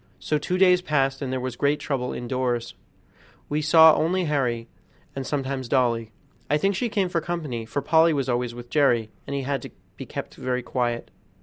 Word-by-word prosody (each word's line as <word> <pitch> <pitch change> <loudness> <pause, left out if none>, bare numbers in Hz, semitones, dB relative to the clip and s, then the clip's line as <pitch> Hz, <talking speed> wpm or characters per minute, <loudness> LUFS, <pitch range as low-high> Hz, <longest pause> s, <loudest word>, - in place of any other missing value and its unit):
So 150 - -1
two 180 +5 -1
days 180 -1 +5
passed, 135 -5 0
and 135 -2 -3
there 130 - -1
was 130 -1 -4
great 145 +1 +1
trouble 125 -3 -2
indoors. 120 -1 -2 0.8
We 150 - -1 0.2
only 160 +3 +6
saw - - -1
Harry, 125 -6 -1 0.5
and 135 -1 -4
sometimes 135 -3 -3
Dolly. 115 -4 +1 0.4
I 150 - +3
think 195 +6 +1
she 235 +6 -1
came 200 -3 +1
for 175 -2 -1
company, 150 -10 -4
for 135 +5 -3
Polly 160 +3 +5
was 140 -4 -1
always 120 -1 -1
with 120 0 -10
Jerry, 120 -7 +2 0.2
and 140 - -3
he 140 - -2
had 140 +1 -2
to - - -8 0.3
be - - -8
kept - - -6
very 125 -1 -3
quiet. 120 -2 -2
135 Hz, 195 wpm, -25 LUFS, 125-155 Hz, 0.8 s, only